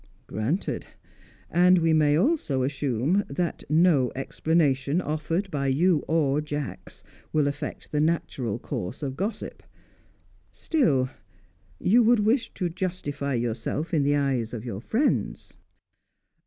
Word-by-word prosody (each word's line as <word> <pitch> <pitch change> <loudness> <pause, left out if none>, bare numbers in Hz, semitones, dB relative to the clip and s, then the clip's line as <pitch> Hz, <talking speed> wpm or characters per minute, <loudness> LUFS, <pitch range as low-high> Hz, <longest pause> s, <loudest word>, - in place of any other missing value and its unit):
"Granted. 120 - -2 0.6
And 180 +1 +5
we 165 -1 +3
may 150 -1 +4
also 180 - +1
assume 140 - 0
that 170 +5 -2
no 155 -5 +4
explanation 140 +1 +1
offered 165 +4 -2
by 140 -3 -1
you 160 +5 +3
or 150 -3 +2
Jacks 150 -2 -6 0.3
will 150 -2 +2
affect 145 +1 -5
the 150 - +1
natural 135 -8 -1
course 120 - -5
of 135 -2 -3
gossip. 200 +8 -4 0.9
Still, 140 - +1 0.7
you 225 - +4
would 235 -1 +4
wish 230 +4 +1
to 180 - -1
justify 160 -6 -3
yourself 120 +7 -2
in 155 - +3
the 145 +1 +2
eyes 130 -5 0
of 115 +1 -7
your 110 -4 -5
friends." 235 - -1
150 Hz, 125 wpm, -26 LUFS, 135-175 Hz, 0.9 s, And